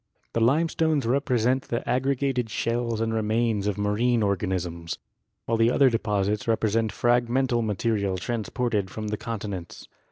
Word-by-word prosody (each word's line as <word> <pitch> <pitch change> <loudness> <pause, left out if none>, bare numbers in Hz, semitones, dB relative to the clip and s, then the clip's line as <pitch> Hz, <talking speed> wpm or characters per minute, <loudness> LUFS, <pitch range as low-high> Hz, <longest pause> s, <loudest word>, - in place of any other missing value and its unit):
The 115 - 0
limestones 155 +2 +2
represent 125 0 +1
the 120 - -3
aggregated 130 -2 0
shells 115 0 -1
and 115 0 0
remains 110 -1 0
of 105 - -1
marine 110 +3 +1
organisms, 90 -4 -2 0.5
while 115 0 0
the 115 +1 +5
other 130 +1 +4
deposits 105 -2 0
represent 110 -1 +1
fragmental 120 0 +1
material 105 -2 0
transported 115 -1 -2
from 110 +2 -5
the 105 - -2
con 115 +1 -4
tinents. 95 -5 -6
115 Hz, 135 wpm, -26 LUFS, 105-125 Hz, 0.5 s, the